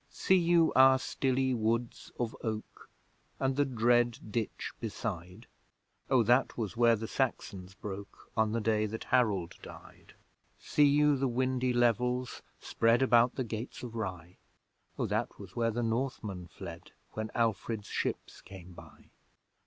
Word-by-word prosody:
See - - +1
you 170 -2 +4
our 130 0 +7
stilly 130 0 0
woods 115 +1 -2
of 120 -2 -2
oak, 110 -1 -6 0.5
And 135 0 0
the 145 +1 +2
dread 120 -1 +2
ditch 110 0 -3
beside? 90 +2 -5 0.6
O 130 -3 +4
that 120 +4 +2
was 110 -2 -3
where 115 0 +5
the 110 +1 -5
Saxons 95 -8 -3
broke, 100 0 -8
On 110 -1 +2
the 115 +1 -1
day 110 0 +1
that 110 +2 -6
Harold 105 -9 +2
died! - - -13 0.4
See 145 -1 +3
you 145 +1 +4
the 135 +1 +1
windy 130 +1 0
levels 125 +1 +1 0.2
spread 115 +3 +2
About 120 -1 +4
the 130 - -1
gates 115 +2 -6
of 120 -2 -6
Rye? 90 -6 -5 0.6
O - - 0
that - - -2
was - - -11
where 115 -1 +1
the 120 +2 -2
Northmen 115 -6 -3
fled, 85 -2 -10 0.2
When 110 0 -4
Alfred's 115 -2 -1
ships - - -4
came 95 -2 -12
by! - - -15
115 Hz, 145 wpm, -31 LUFS, 105-130 Hz, 0.6 s, our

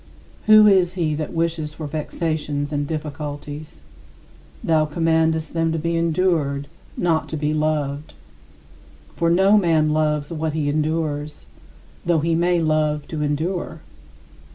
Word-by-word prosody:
Who 215 0 +8
is 185 -4 +4
he 165 -5 -1
that 150 0 -3
wishes 165 -2 -2
for 155 - -6
vexations 150 -1 -3
and 145 0 -1
difficulties? 150 - -6 0.8
Thou 155 -1 +2
commandest 160 0 +1
them 165 -1 +1
to - - -1
be 165 +2 -1
endured, 165 -4 +1 0.3
not 165 -2 0
to 160 - -3
be 150 0 -1
loved. 150 -1 -2 1.0
For 170 0 +1
no 190 +5 +5
man 160 -4 +2
loves 150 0 0
what 155 -1 -2
he 150 -2 -1
endures, 150 -1 -2 0.6
though 170 -1 +2
he 165 +2 +1
may 175 +1 +2
love 155 -2 0
to 155 -2 -4
endure. 160 +2 -2
155 Hz, 130 wpm, -22 LUFS, 150-165 Hz, 1.0 s, Who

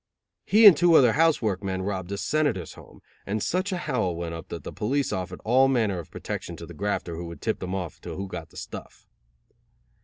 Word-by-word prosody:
He 220 +2 +6
and 200 -5 +11
two 170 +2 +4
other 125 -6 +7
house 160 -3 +3
work 100 -3 0
men 95 -1 -2
robbed 95 -2 -3
a 100 - -2
senator's 135 - 0
home, - - -16 0.2
and 105 +1 -2
such 185 +3 0
a 185 - -1
howl 110 - -1
went 85 0 -4
up 80 -1 -7
that - - -7
the - - -7
police 135 +6 -1
offered 90 -1 -4
all 130 +4 +5
manner 110 -8 +1
of 85 - -9
protection - - -6
to - - -9
the - - -11
grafter 100 -4 -2
who 85 +1 -6
would 85 - -9
tip 110 - -2
them 95 0 -4
off 90 -4 -5
to - - -7
who 100 +1 -4
got 90 -4 -7
the - - -16
stuff. - - -9
100 Hz, 225 wpm, -26 LUFS, 90-135 Hz, 0.2 s, and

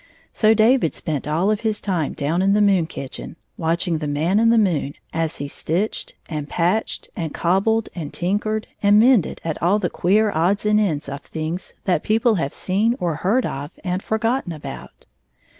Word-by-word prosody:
So 220 0 +4
David 225 - +3
spent 150 -3 -3
all 170 +7 +1
of 215 - -1
his 220 -2 -1
time 175 -7 -1
down 155 +5 -1
in 195 +1 +3
the 210 - +3
moon 195 -5 +3
kitchen, 135 -1 -7 0.2
watching 170 0 0
the 150 - -3
Man 160 +8 +1
in 230 0 +4
the 230 - +4
moon 170 -9 +1 0.2
as 165 -1 -1
he 145 - -4
stitched 175 +8 -2
and 150 -3 -5
patched 180 +6 -1
and 165 -6 -4
cobbled 200 +6 +1
and 160 -5 -6
tinkered 210 +4 -1 0.2
and 205 +1 +5
mended 235 -6 +3
at 160 -2 -3
all 180 +5 +3
the 185 -5 -2
queer 210 +4 +2
odds 185 +7 +1
and 210 0 +4
ends 160 -10 0
of 140 0 -6
things 160 +5 -5
that 185 - +2
people 225 +2 +2
have 140 - -2
seen 210 +6 0
or 170 -5 -1
heard 210 +10 +1
of 140 +2 -4
and 185 0 -2
for 220 - -1
gotten 230 -5 -1
about. 155 - -9
185 Hz, 190 wpm, -21 LUFS, 160-215 Hz, 0.2 s, and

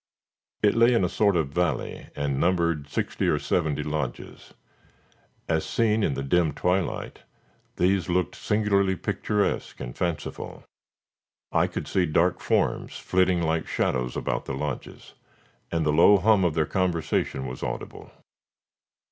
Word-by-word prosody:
It 105 - +5
lay 115 +1 +4
in 115 - +3
a - - +3
sort 100 +1 +2
of 80 -5 +1
valley, 80 -3 -2
and 70 -2 -1
numbered 85 -5 +1
sixty - - -2
or - - +3
seventy 75 -4 0
lodges. 75 -4 -5 1.0
As 80 -1 +1
seen 110 -1 +1
in 75 -9 +1
the 70 - -3
dim 80 +2 +2
twilight 90 +4 -1 0.6
these 90 -1 +1
looked 90 0 0
singularly 100 -3 +1
picturesque 105 +3 -1
and - - -6
fanciful. 85 -3 -4 0.9
I - - +3
could - - -5
see 90 -2 +1
dark 85 +4 +2
forms - - 0
flitting 90 -2 +1
like 80 0 0
shadows 60 -1 -1
about - - -2
the 70 - -4
lodges, 70 -2 -6 0.6
and 85 -1 0
the 75 - +2
low 85 +6 +7
hum 100 +1 +4
of 80 -3 0
their 80 -1 +2
conversation 85 -7 -1
was 65 0 -6
audible. - - -6
85 Hz, 140 wpm, -26 LUFS, 75-95 Hz, 1.0 s, low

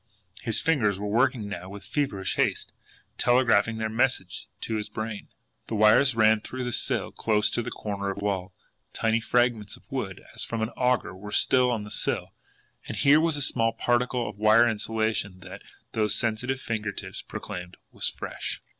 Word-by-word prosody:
His 115 -3 +3
fingers 110 -12 +1
were 105 - -4
working 115 +1 +1
now 95 -2 -6
with 100 0 -9
feverish 105 -7 -1
haste, - - 0 0.5
telegraphing 115 -3 +3
their 110 0 -1
message 110 -5 -1
to 110 - -2
his 105 - -4
brain. 110 -1 -5 0.4
The 115 - -3
wires 110 +5 +5
ran 110 -1 +4
through 130 +3 -5
the 125 - -2
sill - - 0
close 105 -1 +1
to - - 0
the - - -4
corner 100 -1 -4
of 95 - -4
the 100 - -4
wall 95 -1 -1 0.4
tiny 115 0 +1
fragments 120 -3 +1
of - - -24
wood, - - -4
as - - -4
from 115 -1 -2
an 110 - -1
auger, 125 -4 0
were 105 +2 -9
still 125 +4 +4
on 115 -4 -1
the 105 - -9
sill - - -1 0.5
and - - -5
here 145 +2 +6
was 165 -2 +1
a 145 - +1
small 115 -3 +1
particle 120 +1 0
of 105 -1 -8
wire 110 +2 +6
insulation 110 -3 -1
that, 95 -1 -10 0.3
those 105 -2 +1
sensitive 120 +3 0
finger 110 -4 -3
tips - - -6
proclaimed, 90 0 -7
was - - -3
FRESH. - - -5
110 Hz, 180 wpm, -27 LUFS, 105-120 Hz, 0.5 s, here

